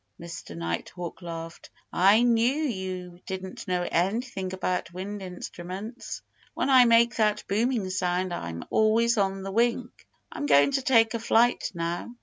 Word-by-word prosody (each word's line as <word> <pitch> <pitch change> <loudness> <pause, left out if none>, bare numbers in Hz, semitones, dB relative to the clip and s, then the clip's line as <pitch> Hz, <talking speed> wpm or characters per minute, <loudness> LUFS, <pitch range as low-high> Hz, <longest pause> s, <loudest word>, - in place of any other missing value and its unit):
Mr. 155 - -8
Nighthawk 85 - -5
laughed. 165 -1 -8 0.2
"I 200 +6 +5
knew 240 +2 +3
you 190 - -4
didn't 190 0 -6
know 180 -1 0
anything 195 +2 -1
about 185 -2 -2
wind 195 +3 -6
instruments. 185 +4 -7 0.3
When 275 - 0
I 255 -2 +8
make 235 +1 +4
that 210 -2 +2
booming 220 0 0
sound 180 0 -1
I'm 85 - -5
always 225 +1 +3
on 195 -1 0
the 195 - -5
wing. 235 +3 +1 0.4
I'm 145 - -4
going 145 - +5
to 270 0 +1
take 230 -4 +4
a 230 - -2
flight 235 +1 +2
now. 170 +3 -3
190 Hz, 145 wpm, -27 LUFS, 175-230 Hz, 0.4 s, I